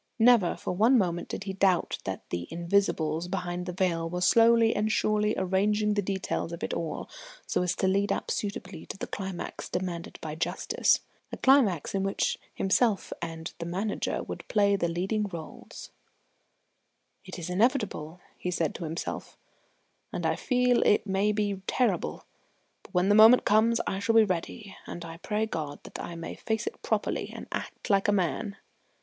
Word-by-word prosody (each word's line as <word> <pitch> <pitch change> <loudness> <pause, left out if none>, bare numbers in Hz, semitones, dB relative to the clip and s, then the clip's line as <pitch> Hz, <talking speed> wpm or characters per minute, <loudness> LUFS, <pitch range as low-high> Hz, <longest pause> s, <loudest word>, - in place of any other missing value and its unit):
Never 230 -6 +5
for - - -4
one 225 +8 +5
moment 175 -5 0
did - - -5
he 195 -1 -4
doubt 190 -2 +2
that 95 -1 -5
the 85 0 -3
Invisibles 170 -2 0
behind 180 -1 -3
the - - -2
veil 170 -2 0
were 180 +1 -3
slowly 230 +4 +5
and 215 +1 +1
surely 210 0 +1
arranging 210 +3 +1
the 205 - +1
details 190 -3 -2
of 170 - -6
it - - -2
all 165 -2 -3 0.4
so - - 0
as 180 0 0
to 190 - +1
lead 200 +2 +2
up - - -2
suitably 195 -4 -4
to - - -7
the - - -4
climax 190 -3 -6
demanded 175 -2 -4
by 155 -1 -5
justice, 160 - +1 0.3
a - - -5
climax 245 - +3
in 195 - 0
which 195 0 0 0.2
himself 205 +2 +1
and 165 -1 -5
the 170 - -4
Manager 195 +5 -2
would - - -7
play 200 -1 +3
the 175 -3 0
leading 190 +6 -1
roles. 170 -5 -9 1.3
"It 185 -2 -8
is 175 0 -5
inevitable," 190 - 0
he 180 - -4
said 170 -3 0
to 170 - -6
himself, 160 +2 -5 0.7
"and - - -3
I - - +2
feel 250 -1 +2
it 210 - +3
may 200 +1 +1
be 205 -2 -1
terrible; 250 - 0 0.6
but - - -18
when 180 +2 +2
the - - +6
moment 220 +4 +8
comes 225 +2 +4
I 190 - -2
shall 225 +3 +1
be 225 - +8
ready, 195 +2 -4
and 170 - -6
I 165 0 -8
pray 210 +4 -1
God 155 -8 -4
that - - -8
I 170 - -6
may 165 0 -6
face 220 0 -2
it 435 - -6
properly - - -1
and - - -8
act - - -4
like 195 0 +3
a - - +4
man." 200 +1 -1
195 Hz, 180 wpm, -28 LUFS, 175-210 Hz, 1.3 s, moment